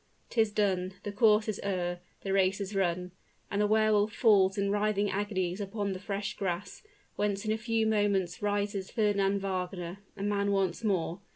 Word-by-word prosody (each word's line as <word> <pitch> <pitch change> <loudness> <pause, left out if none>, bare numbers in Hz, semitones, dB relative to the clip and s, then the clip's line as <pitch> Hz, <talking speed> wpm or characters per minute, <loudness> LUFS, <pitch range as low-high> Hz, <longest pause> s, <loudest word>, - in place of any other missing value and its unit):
'Tis 220 -2 +2
done; 190 -3 0
the 205 - -3
course 215 0 +4
is 215 - -2
o'er 175 -3 -1 0.2
the 195 - -2
race 195 0 +3
is 200 0 -4
run; 180 -2 0 0.4
and 200 - +1
the 210 - +3
Wehr 215 0 +3
Wolf 210 0 +3
falls 200 -5 +4
in 200 0 +1
writhing 205 -1 +1
agonies 190 -1 -1
upon 200 0 -2
the 185 - -6
fresh 205 +2 -3
grass, 180 0 -3 0.4
whence 205 0 -1
in 215 - 0
a - - +2
few 225 0 0
moments 200 -5 +1
rises 205 -1 -1
Fernand 200 -2 +1
Wagner 185 -1 -3 0.2
a 195 - -4
man 200 0 +1
once 195 0 0
more! 185 -4 0
200 Hz, 180 wpm, -30 LUFS, 190-210 Hz, 0.4 s, course